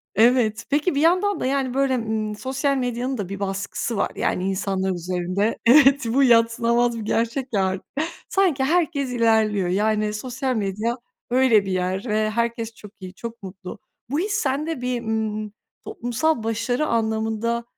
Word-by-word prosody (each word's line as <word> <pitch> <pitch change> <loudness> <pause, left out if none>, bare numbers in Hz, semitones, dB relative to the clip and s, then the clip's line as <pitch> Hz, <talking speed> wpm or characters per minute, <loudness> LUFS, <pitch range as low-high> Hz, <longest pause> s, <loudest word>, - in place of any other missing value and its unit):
Evet, 230 0 +3
peki, 295 +2 +1
bir 285 - +1
yandan 370 +5 +3
da, - - -2
yani, 265 -1 0
böyle, 270 -1 +2
ımm, 220 -2 -2
sosyal 270 +3 -1
medyanın 250 +1 -2
da 195 -3 -4
bir 195 0 -5
baskısı 200 +3 -3
var. - - 0
Yani, 185 +1 -1
insanlar 190 0 -1
üzerinde, 180 +4 -1
evet, 270 0 +6
bu 270 +5 +3
yadsınamaz 235 0 +3
bir 210 - -6
gerçek 235 +3 -1
ya 195 -2 +2
artık. 190 0 -3 0.4
Sanki 350 -9 +2
herkes 305 -3 +1
ilerliyor. 220 -5 +2
Yani, 210 +2 +1
sosyal 255 +3 -3
medya 215 +4 -1 0.3
öyle 245 -5 +4
bir 190 - -3
yer, 185 +4 -1
ve 215 -1 +1
herkes 230 0 -2
çok 210 -1 -13
iyi, 185 0 -9
çok 230 +1 -8
mutlu. 190 +2 -9 0.3
Bu 290 +4 0
his, 405 +3 -1
sende 295 - -1
bir, 250 -1 -2
ımm, 215 -2 -2 0.3
toplumsal 315 - -1
başarı 230 +6 -1
anlamında 225 +1 -1
230 Hz, 160 wpm, -23 LUFS, 210-260 Hz, 0.4 s, evet